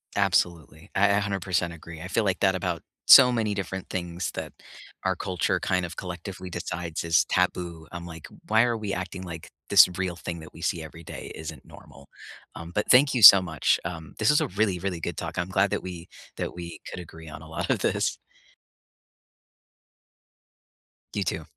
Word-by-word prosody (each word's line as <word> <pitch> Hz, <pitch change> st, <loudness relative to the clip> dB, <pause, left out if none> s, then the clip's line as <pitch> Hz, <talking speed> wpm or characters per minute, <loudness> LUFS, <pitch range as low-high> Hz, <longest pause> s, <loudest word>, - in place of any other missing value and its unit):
Absolutely. 80 Hz, -2 st, 0 dB
I 100 Hz, +1 st, +4 dB
I -, -, +3 dB
100% 90 Hz, -3 st, -1 dB
agree. 85 Hz, -1 st, -11 dB
I 90 Hz, -, -6 dB
feel 100 Hz, +5 st, 0 dB
like 95 Hz, -3 st, 0 dB
that 95 Hz, -1 st, +3 dB
about 90 Hz, -2 st, -2 dB, 0.3 s
so 125 Hz, -2 st, +10 dB
many 110 Hz, -3 st, 0 dB
different 95 Hz, -1 st, -5 dB
things 85 Hz, -1 st, -4 dB
that -, -, -6 dB, 0.5 s
our 95 Hz, 0 st, +1 dB
culture 90 Hz, 0 st, -1 dB
kind 90 Hz, -1 st, 0 dB
of 85 Hz, -, -8 dB
collectively 90 Hz, +1 st, -7 dB
decides 85 Hz, -1 st, -4 dB
is 85 Hz, 0 st, +3 dB
taboo. 85 Hz, -3 st, -1 dB
I'm 85 Hz, -1 st, -7 dB
like, 80 Hz, -2 st, -9 dB, 0.2 s
"Why 110 Hz, +1 st, +4 dB
are 120 Hz, -1 st, 0 dB
we 105 Hz, -3 st, -4 dB
acting 95 Hz, 0 st, -5 dB
like 85 Hz, -3 st, -8 dB, 0.2 s
this -, -, +8 dB
real 95 Hz, -2 st, -2 dB
thing 85 Hz, -1 st, -6 dB
that 80 Hz, -, -13 dB
we 80 Hz, -, -13 dB
see 85 Hz, -1 st, -1 dB
every 80 Hz, +1 st, -11 dB
day -, -, -8 dB
isn't 80 Hz, 0 st, -8 dB
normal?" 70 Hz, 0 st, -16 dB, 0.5 s
Um, 85 Hz, +1 st, -8 dB
but 105 Hz, -, -1 dB
thank 135 Hz, +2 st, +6 dB
you 125 Hz, -, 0 dB
so 100 Hz, -1 st, +12 dB
much. 80 Hz, -4 st, +1 dB
Um, 85 Hz, -2 st, -7 dB
this 110 Hz, +3 st, +4 dB
is 150 Hz, -, +3 dB
a -, -, 0 dB
really, 100 Hz, -1 st, 0 dB
really 90 Hz, -2 st, -3 dB
good -, -, -5 dB
talk. -, -, -5 dB
I'm 90 Hz, +1 st, -2 dB
glad 95 Hz, +1 st, +2 dB
that -, -, -1 dB
we 90 Hz, -2 st, -8 dB, 0.3 s
that -, -, -4 dB
we 85 Hz, -1 st, -8 dB
could -, -, -7 dB
agree 80 Hz, -2 st, -11 dB
on 75 Hz, -1 st, -10 dB
a 80 Hz, -, -12 dB
lot 80 Hz, -, -4 dB
of -, -, +2 dB
this. -, -, 0 dB, 3.0 s
You 100 Hz, -, -1 dB
too. -, -, -2 dB
90 Hz, 190 wpm, -26 LUFS, 85-95 Hz, 3.0 s, so